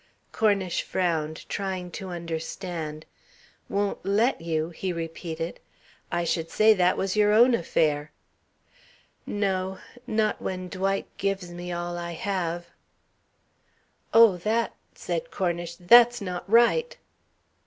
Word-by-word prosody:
Cornish 200 -5 +1
frowned, 160 -4 -2
trying 190 -3 -3
to 190 +3 -6
understand. 165 -2 -5 0.6
"'Won't 200 0 -1
let 210 +4 +2
you!'" 160 -1 -1
he 185 +2 -3
repeated. 165 0 -5 0.5
"I 175 0 0
should 165 -1 -1
say 215 +5 +5
that 185 -2 +2
was 195 0 -1
your 210 0 +4
own 240 +4 +6
affair." 155 -6 +1 1.2
"No. 190 -2 -1 0.3
Not 220 -2 0
when 185 -1 -4
Dwight 195 +1 -1
gives 195 -3 -2
me 175 +1 -6
all 175 0 -3
I 170 0 -5
have." 175 -1 -2 1.5
"Oh, 225 -5 +7
that 220 +6 0
" - - -40
said - - -3
Cornish. 175 - -2
"That's 240 +7 +6
not 180 -2 -5
right." 240 - +4
185 Hz, 120 wpm, -26 LUFS, 170-205 Hz, 1.5 s, Oh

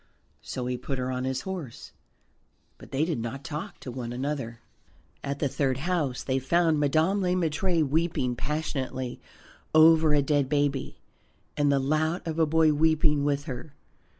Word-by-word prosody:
So 125 - -5
he 125 0 -2
put 135 - -4
her 130 0 -2
on 130 0 -2
his 130 0 -1
horse, 180 -11 -7 0.9
but - - -13
they 140 +3 +1
did 160 -7 -2
not 120 +4 -5
talk 160 -1 -6
to 125 - -6
one 120 -1 -5
another. 130 -2 -3 0.6
At 140 0 -3
the 145 - 0
third 135 -1 0
house 150 -5 -1
they 130 0 0
found 160 +3 +2
Madame 160 +7 +2
Le 180 -1 +1
Maître 165 -1 +1
weeping 150 -4 0
passionately 135 -3 -3 0.5
over 160 -1 +6
a 145 - +3
dead 145 -2 +1
baby, 145 -2 0 0.6
and 145 -1 +2
the 140 - +3
lout 155 +5 0
of 165 -1 -3
a 160 - +4
boy 160 0 +4
weeping 155 -1 +3
with 145 0 0
her. 140 0 -7
145 Hz, 165 wpm, -27 LUFS, 130-160 Hz, 0.9 s, over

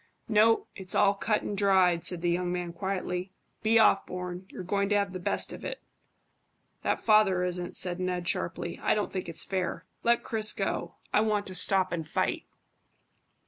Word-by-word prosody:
"No. 225 0 +4
It's 190 -2 -2
all 200 0 +4
cut 210 +1 -1
and 205 - -3
dried," 190 -4 +3
said 180 -2 +1
the 175 - +2
young 175 0 -1
man 175 -1 -3
quietly. 185 0 -3 0.3
"Be 225 +1 +3
off, 215 -3 +5
Bourne; 180 0 -6
you're - - -8
going 200 +2 0
to 205 - +2
have 200 -2 0
the 185 - -5
best 175 - 0
of - - -10
it." - - -5 1.0
"That - - 0
father 210 -4 +3
isn't," 180 -1 -2
said 180 -1 +2
Ned 180 -1 -2
sharply. - - -3
"I - - +2
don't 210 - -2
think 185 -2 -4
it's 165 - -3
fair. 185 -2 -3 0.2
Let 235 0 +2
Chris 215 -1 +2
go. - - -3 0.2
I 210 - +4
want 210 -2 0
to 185 - -7
stop 185 0 +3
and 165 -3 -3
fight." - - -1
190 Hz, 185 wpm, -28 LUFS, 180-205 Hz, 1.0 s, off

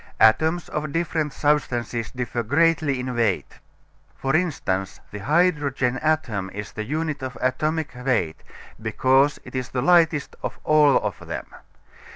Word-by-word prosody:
Atoms 160 +9 +4
of 150 -1 -3
different 160 -2 -1
substances 120 -7 0
differ 125 -2 -3
greatly 145 +2 +2
in 125 0 -3
weight. 115 -5 -1 0.6
For 135 +2 -1
instance, 120 - -1
the 105 - -6
hydrogen 140 - +1
atom 120 -12 0
is 105 0 -6
the 110 - -5
unit 155 +2 -2
of 130 -1 -5
atomic 155 +5 0
weight, 125 -11 -1 0.4
because 130 +6 +3
it - - -12
is 130 -1 -3
the 125 -1 -2
lightest 165 -2 +3
of - - -4
all 150 -2 +5
of - - -4
them. - - -4
135 Hz, 140 wpm, -23 LUFS, 120-155 Hz, 0.6 s, all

